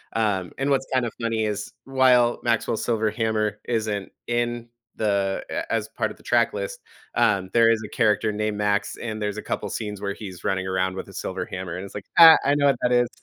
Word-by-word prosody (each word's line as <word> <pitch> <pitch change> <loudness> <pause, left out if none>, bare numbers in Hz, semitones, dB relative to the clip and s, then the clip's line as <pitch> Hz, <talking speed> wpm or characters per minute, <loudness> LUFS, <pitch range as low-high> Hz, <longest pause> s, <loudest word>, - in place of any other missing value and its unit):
Um, 100 -5 0
and 135 +1 -1
what's 135 -1 +1
kind 130 -2 +2
of 115 - -3
funny 115 -1 0
is, 105 -1 -4
while 130 -3 +4
Maxwell's 115 -1 0
Silver 110 -2 0
Hammer 110 -2 -1
isn't 110 -4 -2 0.2
in 120 0 -1 0.3
the 100 -2 0
a - - -4
as 110 -1 0
part 115 - -2
of - - -12
the - - -20
track - - +2
list, - - -4 0.4
um, 100 -6 +2
there 115 -1 +5
is 110 -1 +1
a - - -9
character 110 -2 +2
named 105 0 -2
Max, 105 0 0
and 110 -2 -5
there's 105 0 -2
a - - -3
couple 105 - -3
scenes 105 -1 -5
where 100 -1 -2
he's 95 -4 -9
running 95 -1 0
around 95 0 0
with - - -6
a - - -13
silver - - -4
hammer, 90 -2 -6
and 95 - -6
it's - - -12
like, 100 -1 -6
"Ha, 165 -1 +11
I 140 +1 +3
know 145 -1 +3
what 135 - +3
that 125 - +2
is." 120 0 +3
110 Hz, 225 wpm, -24 LUFS, 100-120 Hz, 0.4 s, Ha